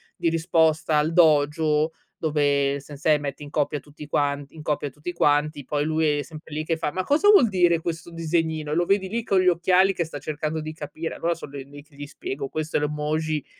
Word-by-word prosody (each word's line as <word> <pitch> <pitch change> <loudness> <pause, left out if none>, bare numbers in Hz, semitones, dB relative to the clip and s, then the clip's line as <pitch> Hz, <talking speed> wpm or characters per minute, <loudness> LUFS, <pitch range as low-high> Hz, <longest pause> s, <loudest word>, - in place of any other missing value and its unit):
di - - -1
risposta 160 -1 +2
al 150 +2 +1
Dojo, 155 -1 +3 0.3
dove 145 -2 +1
Sensei, 150 +2 0
mette 145 0 -5
in 145 - -9
copia 150 0 0
tutti 150 +1 -12
quanti 145 0 -1
in 160 - -9
copia 145 -1 -1
tutti 150 +6 -7
quanti, 150 -2 +1
poi 145 +2 -1
lui 155 -1 +1
è - - 0
sempre 155 +1 -12
lì 155 - -2
che 165 - 0
fa: 150 -2 -2
"Ma 185 +3 -2
cosa 310 - +3
vuol 395 - +7
dire 175 -4 +3
questo 165 +1 -5
disegnino?" 160 -2 -1
Lo 175 +2 +2
vedi 195 0 +1
lì 230 +5 -2
con 195 -3 +2
gli 185 - +2
occhiali 180 +2 +4
che 170 - -1
sta 155 -2 -7
cercando 155 +1 -3
di 155 0 -6
capire? 155 +1 -6
Allora 170 0 -1
sono 150 - -10
l 135 -1 -8
lì 145 0 -12
che 150 -1 -24
gli 145 0 -8
spiego: 140 -1 -5
"Questo 155 0 -2
è - - +1
l'emoji, 150 0 -2
155 Hz, 215 wpm, -24 LUFS, 145-165 Hz, 0.3 s, vuol